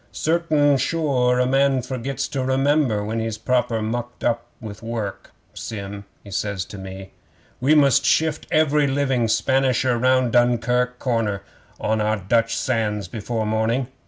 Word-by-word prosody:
'"Certain 155 -3 +2
sure 130 -3 +1
a 125 - +3
man 135 +1 +2
forgets 130 0 -3
to 135 -2 -3
remember 130 -4 +1
when 110 +2 -2
he's 110 -1 -3
proper 120 -3 0
mucked 120 +2 -4
up 120 0 0
with 105 -3 -9
work. 115 -4 -5 0.2
Sim," 100 -1 -7 0.2
he 100 - -12
says 100 -2 -2
to 105 - -10
me, 95 0 -9 0.5
"we 140 +5 +3
must 140 -4 +4
shift 160 -1 +1
every 150 -2 +3
living 135 -4 +1
Spanisher 130 0 +1
round 130 -1 +3
Dunkirk 125 +1 +2
corner 115 -6 -1 0.4
on 110 0 0
to - - +1
our 110 +1 +1
Dutch 115 +4 +1
sands 105 -5 -1
before 110 +3 -3
morning. 110 +4 0
120 Hz, 150 wpm, -22 LUFS, 110-135 Hz, 0.5 s, must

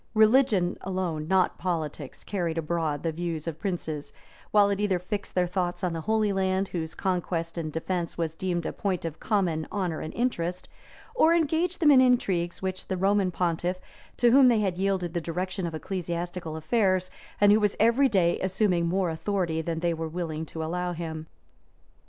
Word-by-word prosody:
Religion 215 -5 +4
alone, 180 -5 -3
not 190 0 +2
politics, 155 -6 -4
carried 170 -5 -2
abroad 160 -2 -1
the 165 - 0
views 165 -1 -4
of 165 -1 -4
princes, 160 -5 -4 0.4
while 205 -1 +5
it 200 - -1
either 200 -3 +2
fixed 200 +3 -5
their 180 -1 +3
thoughts 180 0 -2
on 180 -2 0
the 165 - -3
Holy 215 +2 +1
Land, 190 0 0
whose 160 -2 -4
conquest 175 -3 -2
and 160 -3 -3
defence 170 +1 -3
was 165 -2 -1
deemed 175 -1 -2
a - - -3
point 190 -4 -2
of 160 -1 -5
common 180 -7 0
honor 180 -6 -2
and 155 - -5
interest, 180 -8 -1 0.5
or 335 -9 +4
engaged 335 +2 +1
them 305 -3 +6
in 265 -2 +7
intrigues 190 -10 +1
with 185 0 -3
the 190 - -2
Roman 195 0 +2
pontiff, 175 +1 -1 0.4
to 240 -1 +4
whom 265 +1 +7
they 230 -3 +4
had 185 -3 -1
yielded 190 -3 0
the 170 - -1
direction 180 +2 -3
of 165 - -5
ecclesiastical 175 -1 -4
affairs, 185 +2 +1 0.3
and 205 0 +6
who 210 - +6
was 210 -2 +1
every 235 +5 +4
day 180 -6 +2
assuming 185 -2 +1
more 180 0 +1
authority 160 -1 -1
than 165 0 -3
they 170 -1 +1
were 160 0 -4
willing 160 -2 -4
to 160 - -5
allow 180 +2 -2
him. 160 -2 -5
180 Hz, 180 wpm, -27 LUFS, 165-200 Hz, 0.5 s, in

